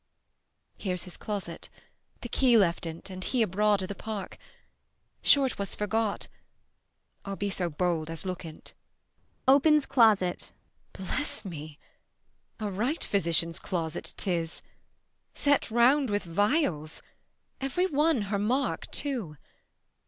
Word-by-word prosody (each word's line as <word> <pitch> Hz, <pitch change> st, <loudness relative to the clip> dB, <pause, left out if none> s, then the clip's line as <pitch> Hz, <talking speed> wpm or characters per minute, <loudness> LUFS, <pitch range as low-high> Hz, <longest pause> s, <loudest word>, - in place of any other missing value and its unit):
Here's 180 Hz, -3 st, -2 dB
his 180 Hz, -, -9 dB
closet, 195 Hz, -5 st, -5 dB, 0.5 s
The -, -, -5 dB
key 245 Hz, -1 st, +4 dB
left 170 Hz, -4 st, +2 dB
in't, 165 Hz, +4 st, -7 dB
and 185 Hz, 0 st, -6 dB
he 245 Hz, +2 st, +1 dB
abroad 205 Hz, 0 st, +2 dB
i' -, -, -1 dB
th' 200 Hz, -, -6 dB
park: 210 Hz, -4 st, -6 dB, 0.8 s
Sure 280 Hz, -2 st, +6 dB
'twas 200 Hz, -5 st, -2 dB
forgot; 210 Hz, 0 st, -1 dB, 1.0 s
I'll 195 Hz, 0 st, -4 dB
be 200 Hz, +1 st, -2 dB
so 180 Hz, -2 st, -1 dB
bold 165 Hz, 0 st, -1 dB
as 165 Hz, +2 st, -5 dB
look 185 Hz, -1 st, -4 dB
in't. 160 Hz, -2 st, -10 dB, 0.7 s
[Opens 285 Hz, +2 st, +6 dB
closet.] 210 Hz, -8 st, +3 dB, 0.4 s
Bless 215 Hz, +4 st, -3 dB
me! 155 Hz, -4 st, -7 dB, 0.8 s
A 210 Hz, -2 st, -2 dB
right 240 Hz, -, 0 dB
physician's 170 Hz, -2 st, +1 dB
closet 165 Hz, -2 st, -4 dB
'tis, 170 Hz, -4 st, -1 dB
20 -, -, -34 dB, 0.7 s
Set 285 Hz, -3 st, +2 dB
round 250 Hz, +4 st, +4 dB
with 205 Hz, 0 st, 0 dB
vials, 180 Hz, -, 0 dB, 0.6 s
every 275 Hz, +7 st, 0 dB
one 300 Hz, -, +2 dB
her 200 Hz, -, +1 dB
mark 250 Hz, +7 st, 0 dB
too. 235 Hz, -, -2 dB
200 Hz, 125 wpm, -28 LUFS, 175-245 Hz, 1.0 s, Sure